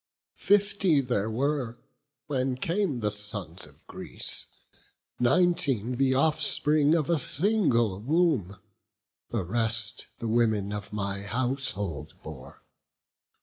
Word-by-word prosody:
Fifty 200 -5 +3
there 120 -5 -1
were, 125 0 -1 0.5
when 130 -2 -1
came 165 - -1
the 105 -1 0
sons 105 -4 -4
of - - -22
Greece; - - -3 0.7
Nineteen 135 - +1
the 130 0 +2
offspring 150 +1 +3
of 155 -4 0
a 170 -3 +2
single 135 - +2
womb; 135 - +1 0.7
The 115 -5 -2
rest, 115 +3 -1
the 115 - -5
women 110 -3 +1
of 105 -1 -6
my 100 -1 -3
household 105 - -2
bore. - - -11
125 Hz, 105 wpm, -27 LUFS, 105-150 Hz, 0.7 s, Fifty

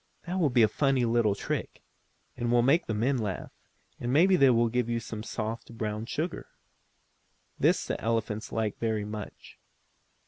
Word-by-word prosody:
That 180 +2 -2
will 160 -5 +3
be 120 -2 +4
a - - +6
funny 135 0 +1
little 115 -3 +2
trick, - - -4 0.5
and 120 -1 -2
will 120 0 +4
make 140 +7 +3
the 110 - -1
men 125 +5 +1
laugh, 105 -5 -4 0.5
and 120 - -2
maybe 180 +7 +5
they 140 -6 +6
will 120 -1 +4
give 120 0 -1
you 115 0 0
some 110 -1 -7
soft, 115 +1 -5
brown 110 0 -3
sugar." 155 +8 -3 1.1
This - - +3
the - - -3
elephants 115 -1 -2
like 110 -2 -2
very 110 -2 -1
much. 105 -1 -8
115 Hz, 170 wpm, -28 LUFS, 110-130 Hz, 1.1 s, a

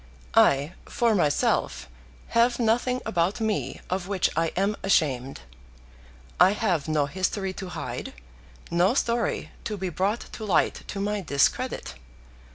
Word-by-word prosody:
"I, 140 +5 +4
for 235 -4 +1
myself, 150 -8 +1 0.4
have 235 +1 +3
nothing 245 +2 +1
about 175 +5 0
me 220 -2 -2
of 185 0 -2
which 195 -2 +1
I 165 +1 +2
am 200 +3 +1
ashamed. 135 - +1 1.0
I 185 +3 +7
have 185 -9 0
no 155 -2 +2
history 185 +4 -2
to 190 -1 -7
hide, 165 -2 -5 0.6
no 175 +7 +3
story 235 -3 0
to 210 -2 -3
be 190 -1 -3
brought 195 +7 -1
to 220 - -9
light 200 -5 +1
to 200 - -5
my 205 +1 -1
discredit. 140 - 0
190 Hz, 135 wpm, -26 LUFS, 170-215 Hz, 1.0 s, I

